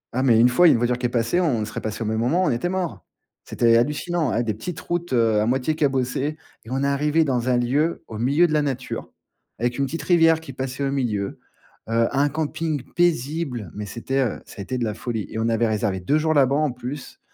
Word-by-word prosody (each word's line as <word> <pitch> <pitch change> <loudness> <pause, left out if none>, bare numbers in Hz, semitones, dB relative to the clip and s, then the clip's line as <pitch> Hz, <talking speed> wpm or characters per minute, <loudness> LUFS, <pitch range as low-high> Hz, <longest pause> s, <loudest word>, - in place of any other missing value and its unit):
Ah, 130 - +1
mais 120 -4 +4
une 120 - +7
fois, 145 +8 +5
une 140 - +6
voiture 120 +1 0
qui 125 - +1
est - - -7
passée, 120 +9 +1
on 120 -11 +1
serait 110 - -6
passé 110 +1 -4
au - - -4
même 110 +1 -1
moment, 155 +11 +2
on - - +2
était 120 +9 -1
morts! 175 - -3 0.4
C'était 115 -1 +3
hallucinant 150 +4 0
ah 120 - 0
des 110 -2 -1
petites 150 - -6
routes 175 0 -3
heu, 115 -4 +3
à 110 - +1
moitié 130 +5 +1
cabossées. 135 +1 0 0.3
Et - - -11
on 135 +2 -1
est 140 - +2
arrivés 150 +3 +2
dans 125 -3 0
un 125 - +3
lieu 145 +7 0
au 110 - -7
milieu 140 +9 +3
de 155 - -1
la 150 - +3
nature, 135 -3 -4 0.5
avec 120 +3 -1
une 140 - +2
petite 165 +5 -5
rivière 165 -2 +4
qui 160 -5 -10
passait 130 +1 -4
au 135 - 0
milieu, 110 -8 -2 0.5
heu, 115 0 +2
un 145 +1 +3
camping 155 -1 -2
paisible, 150 - 0
mais 105 0 -6
c'était 130 +5 -3
heu, 120 - -1
ça - - -14
a - - -3
été 125 +6 -3
de 125 - -1
la 110 -2 -1
folie. 115 -3 -4
Et 110 - -4
on 115 +1 +1
avait 115 0 +2
réservé 105 -3 -1
2 140 +12 +1
jours 155 0 +1
là-bas 135 -1 +4
en 150 -3 +1
plus. 125 +3 -7
130 Hz, 240 wpm, -23 LUFS, 115-155 Hz, 0.5 s, une